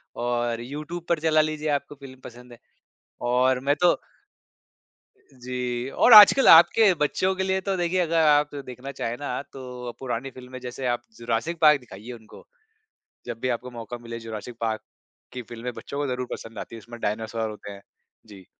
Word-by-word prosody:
और 120 -1 -1
यूट्यूब 150 +7 -7
पर 170 -2 +2
चला 155 -1 +3
लीजिए, 155 0 -3
आपको 145 0 -2
फ़िल्म 135 -2 -13
पसंद 125 +1 -12
है। 115 - -15 0.7
और 130 +1 +2
मैं 145 - +5
तो 175 +3 +4 1.4
जी, 125 0 -4
और 240 - +5
आजकल 215 +6 +9
आपके 185 +5 +7
बच्चों 185 +5 0
के 190 - -1
लिए 190 0 0
तो, 195 0 -2
देखिए, 175 +1 0
अगर 165 -1 0
आप 145 0 +3
देखना 135 0 -8
चाहें 115 +1 -2
ना, 140 -2 -3
तो 125 -2 -7
पुरानी 130 0 -4
फ़िल्में, 130 0 -10
जैसे 125 +1 -7
आप 120 - -13
जुरासिक 120 +9 -2
पार्क 150 -2 +6
दिखाइए 115 0 -11
उनको, 110 -2 -14 0.8
जब 120 -2 -6
भी 130 - -2
आपको 125 +1 -11
मौका 120 0 -7
मिले। 115 0 -8
"जुरासिक 115 +1 -8
पार्क" 110 -1 -2 0.5
की 125 - -5
फ़िल्में 120 +2 -7
बच्चों 140 - -8
को 145 - -1
ज़रूर 125 -1 -3
पसंद 115 -2 -7
आती - - -8
हैं, 115 - -8
जिसमें 120 +1 -11
डायनासोर 110 +1 -2
होते 105 -1 -9
हैं। 100 0 -11 0.5
जी। 95 -3 -14
125 Hz, 175 wpm, -25 LUFS, 120-150 Hz, 1.4 s, आजकल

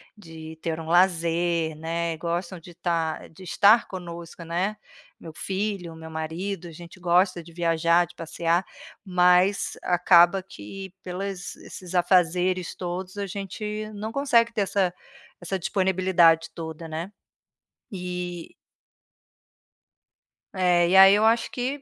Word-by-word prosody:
de 160 -5 -11
ter 165 -1 -3
um 165 - -7
lazer, 170 -2 +2
né, 165 +1 -3
gostam 170 +2 -3
de 170 +2 -13
estar 165 -2 -2
de 175 +4 -15
estar 205 +5 +4
conosco, 170 -2 -8
né. 180 +6 -2 0.4
Meu 160 - -10
filho, 190 -2 -3
meu 160 0 -10
marido, 165 +4 -4
a - - -10
gente 170 +3 -12
gosta 180 +1 +2
de 170 +1 -15
viajar, 170 0 +2
de 175 - -17
passear, 170 +1 -1 0.4
mas 180 +1 +3
acaba 175 +1 +4
que 190 - -10
pelas 185 0 -5
esses 185 0 -10
afazeres 180 0 +2
todos 180 +2 -5
a 200 - -2
gente 210 +3 -5
não 215 +1 -6
consegue 235 -3 +2
ter 220 - 0
essa 190 -2 0 0.5
essa 185 +2 -3
disponibilidade 180 -3 +2
toda, 160 0 -7
né? 165 +4 -5 0.8
E 180 -2 -6 2.0
É, 180 -2 +3
e 185 - +3
aí 195 +1 +9
eu 210 +1 +3
acho 230 +1 +2
que, 260 +3 -3
180 Hz, 130 wpm, -25 LUFS, 170-190 Hz, 2.0 s, aí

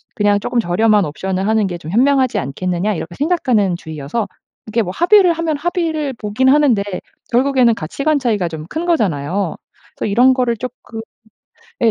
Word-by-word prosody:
그냥 205 -1 +2
조금 235 +4 -1
저렴한 210 +2 +2
옵션을 190 +5 -3
하는 220 -2 +2
게 175 - -5
좀 160 -1 -8
현명하지 260 +3 +2
않겠느냐.' 180 +9 -2
이렇게 170 +1 -6
생각하는 255 - +1
주의여서 160 +6 -4 0.4
이게 225 +2 0
뭐 180 - -4
합의를 360 0 +5
하면 320 -2 -2
합의를 320 -3 -2
보긴 225 +2 -1
하는데 270 -7 +4 0.5
결국에는 250 -2 +3
가치관 280 - -1
차이가 215 -8 0
좀 160 -2 -7
큰 325 +2 -3
거잖아요. 190 - 0 0.4
그래서 - - -2
이런 250 +5 +5
거를 245 -3 0
쪼끔 245 -2 -7 0.8
예 230 - +5
225 Hz, 380 characters per minute, -17 LUFS, 190-275 Hz, 0.8 s, 합의를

